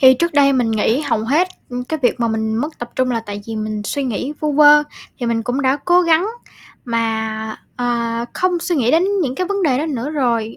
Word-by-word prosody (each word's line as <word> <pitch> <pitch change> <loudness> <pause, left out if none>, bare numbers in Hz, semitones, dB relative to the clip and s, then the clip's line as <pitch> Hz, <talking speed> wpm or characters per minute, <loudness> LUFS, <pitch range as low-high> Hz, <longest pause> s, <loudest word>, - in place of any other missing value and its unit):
thì 260 -2 +8
trước 340 +6 -1
đây 280 -1 +4
mình 245 -4 +1
nghĩ 220 +4 +1
hầu 285 -7 0
hết, 310 +10 +2 0.2
ư, 245 0 -4
cái 315 - -2
việc 245 0 +1
mà 235 - +1
mình 220 0 -1
mất 295 +6 -3
tập 240 0 -6
trung 255 -1 +1
là 230 -2 0
tại 205 0 -6
vì 225 -1 -5
mình 215 -1 -3
suy 280 +6 -2
nghĩ 255 +3 -3
vu 300 -1 0
vơ. 295 +1 +7 0.4
Thì 245 - -3
mình 230 -1 0
cũng 250 +4 -2
đã 265 +1 +2
cố 355 +1 +4
gắng 335 +2 +3 0.6
mà, 220 -2 -2 0.2
ờ, 235 -1 -1
không 365 -1 0
suy 340 0 -1
nghĩ 245 -4 +2
đến 330 +5 +4 0.2
những 260 -5 -2
cái 365 +5 -2
vấn 400 +1 -1
đề 270 -6 +2
đó 310 - -1
nữa 280 -2 -3
rồi, 235 -7 -1
255 Hz, 240 wpm, -18 LUFS, 230-300 Hz, 0.6 s, thì